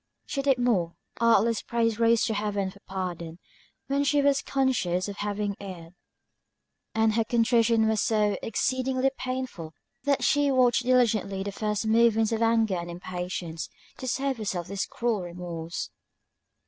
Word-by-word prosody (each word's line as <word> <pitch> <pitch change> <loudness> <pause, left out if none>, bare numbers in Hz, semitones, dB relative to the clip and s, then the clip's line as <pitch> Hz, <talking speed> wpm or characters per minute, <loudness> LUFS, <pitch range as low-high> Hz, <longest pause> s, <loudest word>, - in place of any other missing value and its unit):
She 275 - -2
did 275 -2 +3
more; 205 -9 +1 0.2
artless 230 -1 +3
prayers 230 -1 0
rose 230 -1 +4
to 220 - -1
Heaven 205 -2 -1
for 200 - -17
pardon, 175 -3 -5 0.5
when 280 +1 0
she 285 +1 +2
was 280 -1 +3
conscious 225 -10 0
of 200 0 -6
having 205 0 -2
erred; 180 -4 -9 1.0
and 220 0 +3
her 225 +1 +2
contrition 230 -1 +3
was 220 -1 +1
so 210 -2 +2
exceedingly 260 +3 0
painful, 255 -11 -5 0.3
that 280 -1 +2
she 290 -1 +3
watched 250 -2 +3
diligently 220 -6 +2
the 200 - -4
first 210 +1 -2
movements 225 0 +3
of 225 0 -1
anger 225 -4 +2
and 170 0 -5
impatience, 175 -1 -5 0.3
to 260 - -6
save 270 +1 -1
herself 190 -5 -3
this 195 +1 -3
cruel 235 -4 -1
remorse. 170 -1 -6
220 Hz, 150 wpm, -27 LUFS, 190-245 Hz, 1.0 s, rose